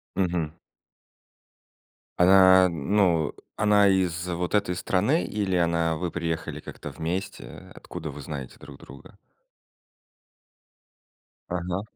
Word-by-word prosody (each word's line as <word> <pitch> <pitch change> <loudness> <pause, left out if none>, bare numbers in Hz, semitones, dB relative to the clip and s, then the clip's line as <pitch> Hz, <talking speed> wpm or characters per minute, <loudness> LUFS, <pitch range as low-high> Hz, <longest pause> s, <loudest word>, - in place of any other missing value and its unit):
Мгм. 85 -4 -1 1.7
Она, 95 0 +7
ну, 85 0 +1 0.2
она 105 -1 +4
из 90 -2 +1
вот 90 +3 -2
этой 95 -3 +1
страны 100 - +1
или 100 -3 -2
она 85 -1 +1
вы 90 0 -3
приехали 85 -2 -4
как-то - - -9
вместе? 90 +5 -6
Откуда 80 -1 -8
вы 70 +1 -8
знаете 70 -3 -7
друг 70 -1 -13
друга? 70 - -15 2.3
Ага. 90 +2 -3
90 Hz, 100 wpm, -25 LUFS, 80-95 Hz, 2.3 s, Она